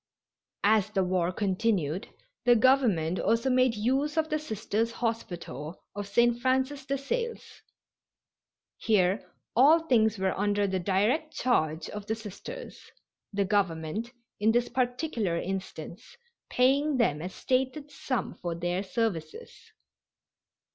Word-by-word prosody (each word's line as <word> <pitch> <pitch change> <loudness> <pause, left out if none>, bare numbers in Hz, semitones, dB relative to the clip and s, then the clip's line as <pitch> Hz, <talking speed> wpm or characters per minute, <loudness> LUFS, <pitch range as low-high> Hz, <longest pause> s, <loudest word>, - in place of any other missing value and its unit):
As 210 0 +4
the 195 -3 +1
war 180 -1 +1
continued 190 -4 0 0.4
the 240 0 +6
Government 220 -9 +3
also 230 +5 +1
made 255 -2 +3
use 270 +8 0
of 315 0 +1
the 305 - +1
Sisters' 225 -4 -2
Hospital 175 - -4
of 205 0 -5
St. 235 +3 +2
Francis 265 +2 0
de 275 - 0
Sales. 465 - -4 1.2
Here 195 -2 +1 0.2
all 295 +8 +6
things 225 -8 +2
were 190 -1 0
under 205 +1 +1
the 190 -1 -1
direct 210 - +1
charge 160 -10 +1
of 210 0 -7
the 220 - 0
Sisters, 225 - -9 0.5
the 200 -1 0
Government, 195 +2 -1 0.3
in 215 +2 +4
this 240 +1 +1
particular 245 - -1
instance, 190 +2 -6 0.3
paying 275 +3 +3
them 150 -11 +2
a 180 - -4
stated 265 +7 -1
sum 255 -7 -3
for 170 -1 -4
their 175 +2 -1
services. 190 -6 -3
220 Hz, 125 wpm, -28 LUFS, 185-255 Hz, 1.2 s, the